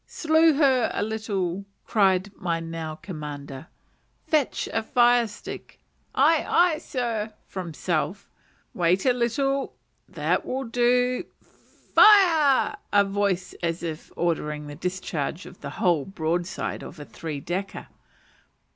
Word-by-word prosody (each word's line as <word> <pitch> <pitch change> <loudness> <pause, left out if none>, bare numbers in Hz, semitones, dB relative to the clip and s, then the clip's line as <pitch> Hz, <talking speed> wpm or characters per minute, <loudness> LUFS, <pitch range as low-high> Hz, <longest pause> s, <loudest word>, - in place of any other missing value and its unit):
"Slew 320 -1 +3
her 265 -5 +3
a - - 0
little," 200 -4 -2 0.2
cried 195 -2 +2
my 170 -3 -2
now 165 -1 -5
commander; 150 -4 -8 0.6
"fetch 300 -4 0
a 225 - +1
fire 240 0 +4
stick." 210 - -10 0.4
"Aye, 305 +4 +4
aye, 345 -3 +3
sir" 230 -8 -3
(from 175 -5 -6
self). 175 +4 -2 0.5
"Wait 180 +2 +1
a 255 - +5
little; 270 +3 -1 0.3
that - - 0
will 265 +1 -3
do 245 +1 +1 0.7
Fire!" 330 -10 +6
(in 205 - +5
a - - +6
voice 195 -2 -1
as 170 0 -2
if 160 -1 -6
ordering 150 -3 -1
the 145 - -8
discharge 175 0 -4
of - - -13
the - - -5
whole 170 -6 +2
broadside 175 -1 -3
of 170 - -10
a 145 - -8
three 155 -2 -6
decker). 185 +6 -4
195 Hz, 130 wpm, -25 LUFS, 170-250 Hz, 0.7 s, Fire